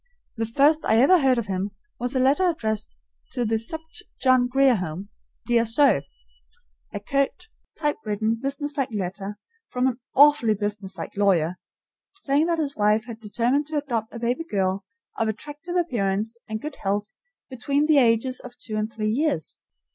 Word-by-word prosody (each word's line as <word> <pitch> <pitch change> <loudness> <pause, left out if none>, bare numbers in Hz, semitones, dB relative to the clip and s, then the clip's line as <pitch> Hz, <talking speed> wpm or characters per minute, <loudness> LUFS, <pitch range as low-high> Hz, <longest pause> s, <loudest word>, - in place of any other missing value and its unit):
The 225 -1 -2
first 290 +7 +3
I 220 - +4
ever 280 +11 +6
heard 265 -3 +3
of 235 - -1
him 195 0 -2 0.3
was 245 +3 -1
a - - +3
letter 285 +8 +3
addressed 220 - -3 0.4
to 245 -2 0
the 225 0 +1
"Supt. 320 +8 -7 0.2
John 255 -1 +4
Grier 270 +1 +4
Home, 180 +2 -5 0.4
Dear 235 -1 +3
Sir," 235 - +3 0.9
a 205 - -4
curt, 275 - -1 0.3
typewritten, 225 -7 -1
businesslike 275 0 -2
letter, 195 0 -4 0.3
from 250 0 0
an 255 -1 0 0.2
AWFULLY 280 -6 +6
businesslike 205 -2 -4
lawyer, 185 -4 +2 0.6
saying 300 -4 +1
that 340 -1 +1
his 290 -3 -2
wife 210 +1 +2
had 230 -2 -8
determined 240 +6 0
to 310 -1 -2
adopt 235 -7 -2
a - - -7
baby 240 +6 -1
girl 190 -1 0 0.4
of 225 - +1
attractive 295 - -5
appearance 225 - 0
and 220 0 -3
good 300 -1 -6
health 205 +2 -2 0.3
between 280 +3 0
the 305 -2 +5
ages 245 +1 +2
of 250 - -11
two 215 -1 -5
and 215 +1 -2
three 215 -1 -2
years. 260 - -1
235 Hz, 160 wpm, -24 LUFS, 210-280 Hz, 0.9 s, ever